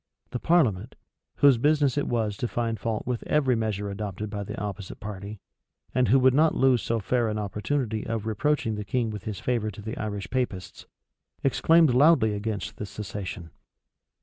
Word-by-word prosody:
The 125 - -3
parliament, 125 - +2 0.4
whose 140 -4 +5
business 145 -1 +3
it 145 - 0
was 110 -4 0
to 120 - -2
find 115 -2 -2
fault 110 +2 -2
with 125 -2 -2
every 135 -4 +2
measure 105 -3 -2
adopted 105 0 -5
by 100 -1 -3
the - - -6
opposite 100 -2 -6
party, 100 0 -7 0.5
and 125 -1 +2
who 130 - +5
would 130 -1 +5
not 155 +3 +4
lose 130 -3 +3
so 115 0 -1
fair 120 +2 0
an 105 - -2
opportunity 110 +2 -2
of 115 -2 -2
reproaching 115 +2 0
the 105 0 -4
king 115 +2 -1
with 105 -3 -7
his 105 -3 -4
favor 115 -4 -1
to 105 0 -9
the 110 +2 -5
Irish 105 -2 -4
Papists, 115 -9 -3 0.6
exclaimed 160 +1 +4
loudly 130 -5 +5
against 105 0 -4
this 105 - -6
cessation. 100 -4 -6
110 Hz, 175 wpm, -26 LUFS, 105-130 Hz, 0.6 s, whose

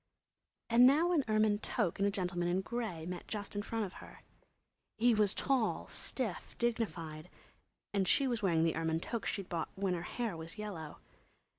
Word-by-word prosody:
And 240 +2 +8
now 315 +6 +4
an 320 -5 +3
ermine 215 -1 +3
toque 210 -6 -1
and 200 - +3
a - - +3
gentleman 180 -3 -1
in 180 +2 +1
grey 200 -7 -4
met 180 0 -6
just 205 -1 -4
in 205 - 0
front 225 0 -2
of 185 - -8
her. - - -13 0.7
He 240 +2 +5
was 210 -2 +2
tall, 265 -5 +1
stiff, 235 -9 -2
dignified, 180 -9 -2 0.6
and 195 -2 +2
she 275 - +4
was 240 -3 -1
wearing 170 -5 +3
the 165 -1 +2
ermine 160 0 0
toque 225 +5 -3
she'd 195 -3 -2
bought 165 -2 -2
when 190 -1 0
her 175 - -2
hair 225 +2 -3
was 165 +4 -7
yellow. 180 -8 -6
200 Hz, 180 wpm, -34 LUFS, 175-230 Hz, 0.7 s, And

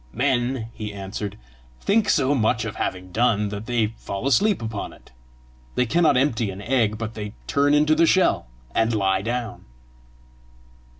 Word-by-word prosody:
"Men," 125 -2 0
he 105 -2 -6
answered, 100 +1 -5 0.4
"think 215 +1 +2
so 140 -2 +3
much 115 -3 +1
of 110 - -5
having 90 0 -3
done, 105 -1 +2
that 105 +2 -6
they 115 -3 0
fall 100 +4 -5
asleep 200 +9 +3
upon 110 -3 -5
it. - - -19 0.6
They 125 - +2
cannot 155 +2 +3
empty 120 -5 +1
an 95 0 -7
egg 110 -1 +1
but 115 0 -5
they 105 -1 -6
turn 145 +1 +3
into 150 +1 +4
the 165 +1 +4
shell, 185 - +3 0.3
and 115 0 +2
lie 95 -2 +1
down!" 120 +1 -4
115 Hz, 160 wpm, -23 LUFS, 105-135 Hz, 0.6 s, into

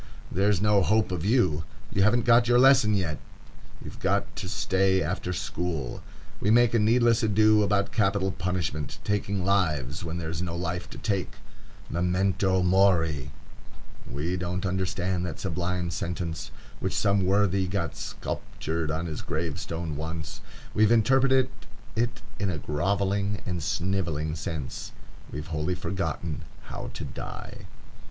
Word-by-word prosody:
there's 100 0 +2
no 105 0 +4
hope 110 +1 +2
of 90 -3 -2
you. 95 - +2 0.3
You 100 - +1
haven't 115 +4 +4
got 120 0 +6
your 120 0 +5
lesson 130 -5 +6
yet. 85 -6 -1 0.7
You've - - -9
got - - 0
to 95 - -4
stay 95 -1 +2
after 90 +2 -2
school. 85 -6 -3 0.4
We 100 - +1
make 120 +1 +5
a 115 - +4
needless 115 +2 +4
ado 110 0 +4
about 100 -1 +1
capital 100 -2 +1
punishment,—taking 95 +2 -2
lives, 80 -8 +1
when 85 0 -4
there 80 -2 -3
is 80 0 -3
no 85 -2 -3
life 85 0 -3
to - - -9
take. 100 -6 -1 0.5
Memento 95 +2 +1
mori! 85 -6 +3 0.8
We 85 +6 -2
don't 90 +2 -2
understand 95 -1 -1
that 85 - -6
sublime 90 -1 -2
sentence 85 -2 -3 0.3
which - - -2
some 100 -1 +3
worthy 95 -1 +2
got 90 -2 -2
sculptured 80 0 -4
on 80 +2 -1
his 80 -3 -4
gravestone 80 0 -3
once. 80 0 -5 0.3
We've 110 +1 +4
interpreted 130 +3 +4 0.5
it 120 0 -1 0.2
in 100 -1 0
a 85 - -2
grovelling 100 +7 0
and 90 -3 -2
snivelling 85 -3 -1
sense; 75 -3 -5 0.4
we've 75 0 -5
wholly 75 +4 0
forgotten 85 -4 -3 0.2
how - - -6
to - - -5
die. - - -8
95 Hz, 140 wpm, -27 LUFS, 85-100 Hz, 0.8 s, got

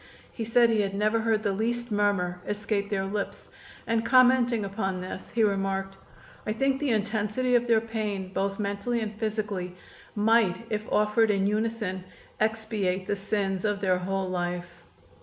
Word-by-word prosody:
He 225 - -4
said 230 +1 +4
he 220 -2 +3
had 195 -1 -2
never 215 +2 +2
heard 220 -1 +1
the 205 - +1
least 235 +3 -2
murmur 200 -4 +1
escape 205 -1 -1
their 195 -2 -1
lips, 200 +1 -4 0.4
and 230 0 +1
commenting 245 -3 +4
upon 195 -2 -2
this 185 +1 -6
he 230 - +1
remarked: 195 -1 0 0.5
"I 215 - +1
think 270 +3 +1
the 290 -2 0
intensity 220 +3 0
of 245 0 +3
their 225 -2 +4
pain, 210 -4 -3
both 195 0 -1
mentally 205 +4 -1
and 215 -1 -3
physically, 210 -4 -3 0.4
might, 220 -2 +3
if 215 0 -3
offered 210 +1 +3
in 195 -2 +2
unison, 210 -3 -1 0.4
expiate 215 -4 0
the 205 - 0
sins 195 -2 -1
of 205 -2 0
their 185 -2 +2
whole 190 +1 -2
life." 175 -1 -4
210 Hz, 160 wpm, -27 LUFS, 195-225 Hz, 0.5 s, said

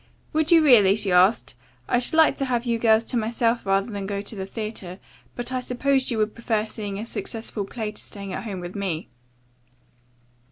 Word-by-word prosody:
"Would 315 0 +1
you 330 -2 +7
really?" 210 -9 +6
she 210 -3 +1
asked. 185 +5 +3 0.3
"I 245 - +2
should 250 - +1
like 320 -3 +5
to 275 - -1
have 245 -2 -1
you 235 -1 0
girls 220 -1 +4
to 240 - -2
myself 230 0 0
rather 195 +3 +1
than 200 -2 -4
go 200 0 -2
to 205 +2 -7
the 190 -1 -5
theatre, 210 -4 -6 0.4
but 245 +1 -3
I 255 - -1
supposed 260 +2 0
you 235 - -1
would 215 0 0
prefer 225 -2 -1
seeing 210 -2 -5
a 215 - -5
successful 225 -3 -5
play 215 +1 -5
to 210 - -9
staying 200 -2 -8
at - - -5
home 195 -4 -5
with 175 +1 -7
me." 185 -5 -3
220 Hz, 205 wpm, -24 LUFS, 200-245 Hz, 0.4 s, you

